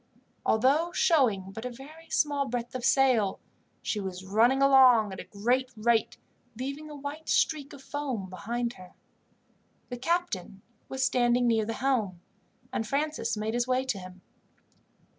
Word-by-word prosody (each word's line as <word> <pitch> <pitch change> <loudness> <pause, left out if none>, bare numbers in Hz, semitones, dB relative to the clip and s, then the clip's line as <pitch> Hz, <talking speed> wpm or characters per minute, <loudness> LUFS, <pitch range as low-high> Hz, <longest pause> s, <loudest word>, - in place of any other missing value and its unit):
Although 280 +10 +3
showing 225 - +2
but 225 +3 -7
a 250 - -3
very 300 +7 -13
small 285 -2 +1
breadth 240 -1 -4
of 255 -1 -5
sail, 245 -7 +3 0.4
she 210 - -1
was 190 -1 -6
running 230 +7 +3
along 255 -7 +6
at 190 - -8
a - - -5
great 245 +5 0
rate, 225 0 +1 0.4
leaving 280 +4 -5
a 300 - -8
white 290 +3 -7
streak 295 -3 +1
of 275 - -12
foam 265 -10 -4
behind 235 +6 -3
her. 185 -3 -14 0.9
The 245 - -5
captain 255 - -2 0.3
was 265 0 0
standing 245 -1 +2
near 225 -2 +2
the 225 - -3
helm, 225 -9 0 0.5
and 225 - -2
Francis 300 -2 -1
made 215 +1 -2
his 240 +1 0
way 255 +1 +1
to 250 -7 -2
him. 185 0 -11
245 Hz, 155 wpm, -28 LUFS, 215-275 Hz, 0.9 s, along